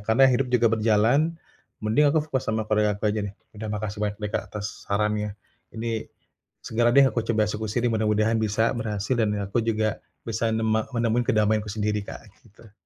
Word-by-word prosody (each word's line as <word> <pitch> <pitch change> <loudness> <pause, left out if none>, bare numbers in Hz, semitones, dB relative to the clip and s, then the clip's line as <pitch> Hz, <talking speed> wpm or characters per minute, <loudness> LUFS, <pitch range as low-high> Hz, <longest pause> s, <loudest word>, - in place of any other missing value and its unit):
Karena 110 +6 +4
hidup 130 0 +3
juga 120 -2 +3
berjalan 115 +9 +2 0.5
mending 145 +8 +4
aku 155 +1 +2
fokus 135 -4 -3
sama 110 0 0
keluarga 105 -1 +1
aku 100 - -7
aja 110 - -1
deh. 100 - -11 0.2
Udah 110 0 -6
makasih 105 0 -4
banyak 105 -1 -1
deh, 105 -1 -4
Kak, - - -1
atas 105 0 -7
sarannya. 105 0 0 0.3
Ini, 115 0 -4 0.6
segera 120 +1 +2
deh 140 - +8
aku 115 - 0
coba 110 -2 +2
eksekusi 110 +3 -2
nih 120 - +3
mudah-mudahan 110 0 +2
bisa 110 +1 +1
berhasil 105 0 -2
dan 105 -1 +1
aku 100 +4 0
juga 110 -1 0 0.3
bisa 115 0 -1
nema 110 -1 +1
menemui 115 0 +1
kedamaianku 105 0 +2
sendiri 105 0 -1
Kak, - - -8 0.2
gitu. 110 0 -19
110 Hz, 180 wpm, -25 LUFS, 105-115 Hz, 0.6 s, deh